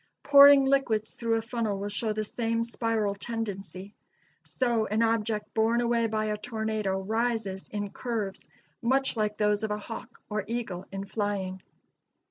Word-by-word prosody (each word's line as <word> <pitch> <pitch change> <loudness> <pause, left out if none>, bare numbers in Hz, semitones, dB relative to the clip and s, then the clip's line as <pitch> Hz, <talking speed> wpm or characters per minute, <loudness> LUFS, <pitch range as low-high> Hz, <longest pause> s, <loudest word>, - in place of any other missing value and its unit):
Pouring 280 -1 +8
liquids 265 -6 +1
through 230 -1 0
a 225 - -1
funnel 230 -3 -2
will 200 +1 -3
show 215 +2 -1
the 215 0 -1
same 230 +1 -1
spiral 225 -3 -1
tendency. 200 -3 -5 0.5
So 235 -4 0
an 215 +2 +1
object 225 -1 0
borne 225 +1 +2
away 235 -1 +2
by 215 0 -1
a 210 0 -1
tornado 220 -3 -2
rises 220 -1 -1
in 205 -1 -3
curves 220 -6 -4 0.3
much 265 +2 +2
like 210 -1 -1
those 210 0 +2
of 220 - -1
a 210 - -1
hawk 225 +2 -8
or 210 -1 -2
eagle 220 -6 -4
in 195 0 -4
flying. 195 -3 -2
220 Hz, 155 wpm, -28 LUFS, 205-230 Hz, 0.5 s, Pouring